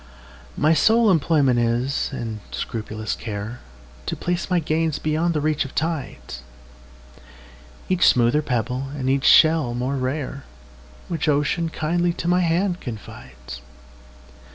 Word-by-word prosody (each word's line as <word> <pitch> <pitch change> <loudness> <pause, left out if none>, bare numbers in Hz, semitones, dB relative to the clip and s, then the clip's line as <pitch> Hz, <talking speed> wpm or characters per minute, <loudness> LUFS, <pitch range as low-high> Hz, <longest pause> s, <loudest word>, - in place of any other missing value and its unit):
My 155 +2 +4
sole 220 +6 +4
employment 145 -7 +3
is, 120 +3 0
and 115 -5 -5
scrupulous 110 -1 -4
care, 110 +2 -6 0.5
To - - -2
place 175 +2 -2
my 180 - +2
gains 160 -1 0
beyond 160 +2 0
the 150 - 0
reach 155 0 +1
of 135 - -10
tides,—Each 155 - -4 1.7
smoother 120 +5 +4
pebble, 125 0 -2
and 130 -2 -3
each 135 0 0
shell 155 -7 +5
more 130 +3 -2
rare, 135 +1 -3 0.6
Which 165 -2 -1
Ocean 150 +3 +1
kindly 170 +2 0
to 170 - -5
my 180 +1 +3
hand 175 +2 0
confides. 65 - -9
145 Hz, 125 wpm, -22 LUFS, 120-165 Hz, 1.7 s, shell